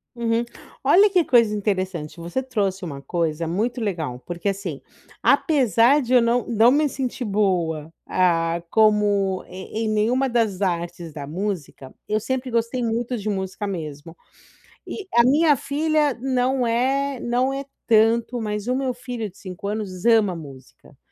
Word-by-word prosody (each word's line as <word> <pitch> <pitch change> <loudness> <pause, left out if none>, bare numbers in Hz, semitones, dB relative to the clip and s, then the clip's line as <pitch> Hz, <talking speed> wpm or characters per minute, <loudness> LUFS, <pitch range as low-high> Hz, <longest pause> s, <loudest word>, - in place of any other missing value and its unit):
Uhum. 235 0 0 0.4
Olha, 410 +3 +6
que 365 -3 +3
coisa 230 -6 +4
interessante. 185 -6 -2
Você 170 +10 -3
trouxe 205 -8 -2
uma 140 -5 -6
coisa 165 +1 -2
muito 225 +9 -1
legal, 165 - -3
porque, 175 +3 -3
assim, 190 -7 -4 0.4
apesar 265 - +4
de 250 -1 -2
eu 250 - +7
não 235 +1 +1
não 230 +1 +4
me 295 +2 +2
sentir 260 -2 -4
boa, 175 -7 0
ah, 170 -2 +1
como 205 -3 +3
em 190 +5 -5
em - - -1
nenhuma 225 +5 +1
das 225 -6 0
artes 175 -3 -2
da 145 -2 -7
música, 170 -6 -5
eu 215 +1 +1
sempre 260 +3 -3
gostei 235 +2 -1
muito 235 +2 -1
de 215 0 -4
música 190 +1 -3
mesmo. 160 -3 -6 0.7
E 405 - -6
a 235 - +7
minha 295 +4 +5
filha 300 +1 +1
não 255 0 +1
é 265 +3 0
não 250 +3 0
é 275 +1 -4 0.2
tanto, 230 +2 +3
mas 210 -1 -3
o 250 - +1
meu 260 -1 -1
filho 245 -3 -5
de 190 - -18
5 190 0 -7
anos 200 -4 -4
ama 220 -5 +4
música. 135 -5 -13
215 Hz, 155 wpm, -23 LUFS, 180-250 Hz, 0.7 s, eu